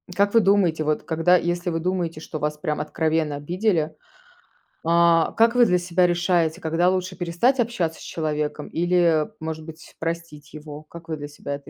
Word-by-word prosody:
как 200 0 +2
вы 230 - +7
думаете, 195 -6 +2
вот, 155 0 -1
когда, 165 +2 +3
если 175 +1 -2
вы 165 -1 -1
думаете, 170 -2 -2
что 155 0 -7
вас 150 0 -2
прям 150 0 -2
откровенно 155 -1 -1
обидели, 165 +1 -1 0.9
а, 170 0 +4
как 230 +1 +3
вы 245 -1 +6
для 180 -3 +3
себя 180 +1 +1
решаете, 175 -1 +1
когда 165 +2 +1
лучше 185 0 -2
перестать 180 +10 +1
общаться 220 -9 -2
с - - -10
человеком 150 -2 -3
или, 170 -2 +2
может 160 0 -5
быть, 160 0 -12
простить 165 -3 -5
его? 150 0 -9
Как 165 +2 -13
вы 160 - -3
для 145 -1 -7
себя 145 -1 -6
это 140 - -12
165 Hz, 180 wpm, -23 LUFS, 155-180 Hz, 0.9 s, вы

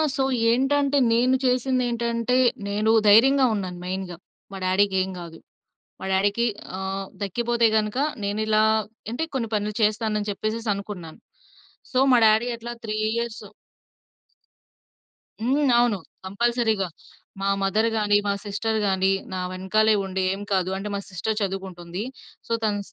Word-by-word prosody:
So 270 - +1 0.3
ఏంటంటే 280 +3 +2 0.2
నేను 250 +3 +3
చేసిందేంటంటే 245 -2 0 0.3
నేను 210 +2 +1 0.2
ధైర్యంగా 260 +6 +6
ఉన్నాను 185 -3 -4
మెయిన్‌గా. 185 -1 -4 0.3
మా 195 - -6
డ్యాడీ‌కేం 190 0 +2
గాదు. 170 -2 -9 0.6
మా - - -5
డ్యాడీకి 205 +4 +2 0.3
ఆహ్, 190 0 -4 0.2
తగ్గిపోతే 235 +4 +1
గనుక 215 +3 0 0.3
నేను 205 +2 -1
ఇలా 215 0 +3 0.5
అంటే 245 +8 -2
కొన్ని 235 -4 -1
పనులు 210 0 -1
చేస్తానని 215 -1 0
చెప్పేసేసి 215 +3 -3
అనుకున్నాను. 195 -5 -8 0.7
సో 255 - +1
మా 250 - +6
డ్యాడీ 220 +3 +4
అట్లా 235 +1 -7
3 215 - -3 0.2
ఇయర్సు 235 -1 -4 1.9
హ్మ్. 270 +5 +1
అవును. 240 -4 +2 0.3
కంపల్సరీ‌గా 220 0 0 0.5
మా 195 - +1
మదర్‌గాని, 215 +1 +2
మా 200 - +2
సిస్టర్‌‌గాని, 205 -2 0 0.2
నా 185 - -2
వెనకాలే 190 +4 +2
ఉండి 190 0 -2
ఏం 195 - -4
కాదు 185 -1 +1
అంటే 195 +2 -5
మా - - -2
సిస్టర్ 200 +4 -2
చదువుకుంటుంది. 190 -1 -4 0.4
సో - - -9
తను 210 -1 +1
215 Hz, 125 wpm, -24 LUFS, 195-235 Hz, 1.9 s, ధైర్యంగా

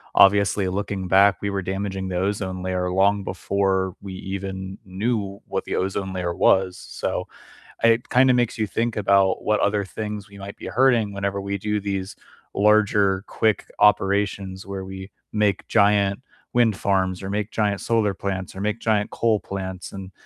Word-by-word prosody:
obviously 100 0 +5
looking 95 0 -3
back, 95 0 +5
we 100 0 -2
were 100 - -1
damaging 95 0 -3
the 90 - -4
ozone 95 -1 -2
layer 90 -1 -1
long 100 +2 +2
before 95 0 -1
we 95 -1 -7
even 95 0 -6
knew 100 +1 -2
what - - -3
the - - -3
ozone 95 0 -2
layer 90 -2 -2
was, 95 0 +3
so, - - -4 0.6
it 115 +1 +4
kinda 130 +1 +5
makes 120 -2 0
you 110 - +1
think 115 +3 -1
about 100 -2 +3
what 105 0 +2
other 100 0 +1
things 105 0 -6
we 100 - -13
might 100 0 -8
be - - -8
hurting 120 -5 +3
whenever 100 0 -2
we 100 0 -3
do 105 +2 -1
these 100 +1 -4 0.4
larger 100 -2 +3
quick 110 -2 0
operations 100 -1 +2
where 95 -1 -5
we 95 0 -8 0.2
make 105 -3 +1
giant 100 -1 +3 0.3
wind 120 -3 +3
farms 95 -1 0
or 95 - -4
make 105 +1 -2
giant 105 -2 0
solar 110 -4 +1
plants 95 -2 -4
or - - -7
make 105 +2 -1
giant 105 -2 +1
coal 115 -2 +1
plants, 95 -2 -6
and 95 -1 -8
100 Hz, 170 wpm, -23 LUFS, 95-105 Hz, 0.6 s, obviously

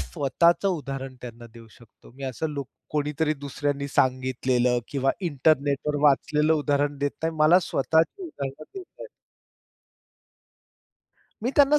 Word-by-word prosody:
स्वतःचं 145 - +2
उदाहरण 135 -6 -4
त्यांना 120 -1 -9
देऊ 115 -1 -13
शकतो. 115 -1 -19
मी 140 - -8
असं 130 +4 -3
लूक 140 -3 -5 0.2
कोणीतरी 150 +1 0
दुसऱ्यांनी 140 0 -3
सांगितलेलं 130 -2 +1
किंवा 135 -1 +1
इंटरनेटवर 145 -2 +1
वाचलेलं 150 +2 +3
उदाहरण 145 -1 0
देत 145 0 0
नाही. 160 0 -1
मला 155 +3 +6
स्वतःची 160 - +1
उदाहरण 140 - -6
देता 390 - -5
येतातं. - - -11 2.3
मी 245 - 0
त्यांना 290 +1 +6
145 Hz, 120 wpm, -25 LUFS, 135-160 Hz, 2.3 s, मला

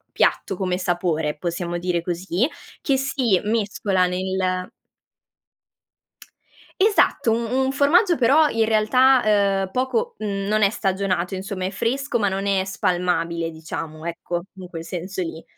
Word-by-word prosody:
piatto - - +1
come 185 -1 -1
sapore, 175 -4 -1
possiamo 175 +1 -3
dire 175 -1 -1
così, 180 +6 -1 0.3
che 275 - +1
si 265 -6 +1
mescola 205 -3 0
nel 185 0 -2 2.1
Esatto, 405 - +3
un 230 +1 0
un 265 +1 +1
formaggio, 335 +6 +3
però 290 +5 +4
in 225 -1 +1
realtà, 250 +4 +4 0.5
uhm, - - -19
poco 455 - -1
mhmm, 200 -2 -3
non 215 +1 +2
è 200 - +5
stagionato 190 -4 -1
insomma, 190 0 -4
è - - -1
fresco 255 +6 -1
ma 205 -2 +2
non 195 +1 -3
è 195 -1 +2
spalmabile, 175 -3 -1
diciamo, 160 0 -7
ecco 170 0 -4
in 185 -1 -9
quel 165 -2 -7
senso 185 +2 -5
lì, 165 -2 -5
190 Hz, 140 wpm, -22 LUFS, 175-235 Hz, 2.1 s, è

